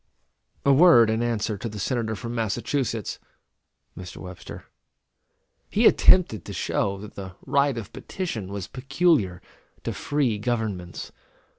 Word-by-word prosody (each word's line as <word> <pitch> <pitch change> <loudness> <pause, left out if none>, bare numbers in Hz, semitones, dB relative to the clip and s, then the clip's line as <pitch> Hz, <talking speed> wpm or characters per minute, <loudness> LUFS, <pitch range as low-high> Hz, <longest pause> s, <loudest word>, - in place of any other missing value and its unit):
A 140 - +6
word 135 -8 +7
in 110 +1 0
answer 110 -3 -1
to 115 - -4
the 105 - -8
Senator 110 +1 -1
from 120 +2 -6
Massachusetts 115 0 -2 0.8
[Mr. 90 +1 -9
Webster]. 90 -1 -9 1.0
He - - +2
attempted 140 - +5
to - - -7
show 100 0 -1
that 105 +2 -10
the 95 -2 -8
right 140 -2 +2
of 110 -3 -7
petition 120 - -5
was 100 -2 -5
peculiar 135 - +1 0.4
to - - -3
free 135 -8 0
governments. 105 -6 -3
115 Hz, 130 wpm, -25 LUFS, 100-130 Hz, 1.0 s, word